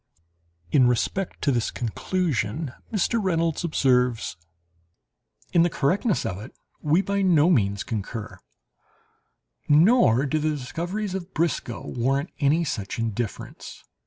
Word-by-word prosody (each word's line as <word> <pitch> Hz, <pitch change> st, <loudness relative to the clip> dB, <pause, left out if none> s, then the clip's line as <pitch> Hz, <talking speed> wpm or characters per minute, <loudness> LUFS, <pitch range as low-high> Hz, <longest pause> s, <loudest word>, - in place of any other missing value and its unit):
In 130 Hz, -3 st, +5 dB
respect 170 Hz, +10 st, -1 dB
to 140 Hz, -, +3 dB
this 120 Hz, -3 st, 0 dB
conclusion 130 Hz, -, -2 dB, 0.2 s
Mr. 220 Hz, +1 st, +1 dB
Reynolds 165 Hz, -3 st, 0 dB
observes: 125 Hz, -, +1 dB, 1.2 s
"In 170 Hz, -, +5 dB
the 175 Hz, -, +4 dB
correctness 180 Hz, -, 0 dB
of 90 Hz, -, -3 dB
it 115 Hz, -, -11 dB, 0.3 s
we 160 Hz, +6 st, +2 dB
by 200 Hz, 0 st, 0 dB
no 175 Hz, -3 st, +4 dB
means 100 Hz, -, +1 dB
concur; 110 Hz, 0 st, -5 dB, 1.3 s
nor 150 Hz, -, +5 dB
do 155 Hz, +2 st, 0 dB
the 155 Hz, +1 st, 0 dB
discoveries 175 Hz, +9 st, -4 dB
of 190 Hz, -1 st, -6 dB
Briscoe 155 Hz, -7 st, -1 dB
warrant 135 Hz, +6 st, -1 dB
any 150 Hz, +4 st, +3 dB
such 105 Hz, -8 st, -4 dB
indifference. 115 Hz, -1 st, -5 dB
150 Hz, 120 wpm, -25 LUFS, 120-175 Hz, 1.3 s, In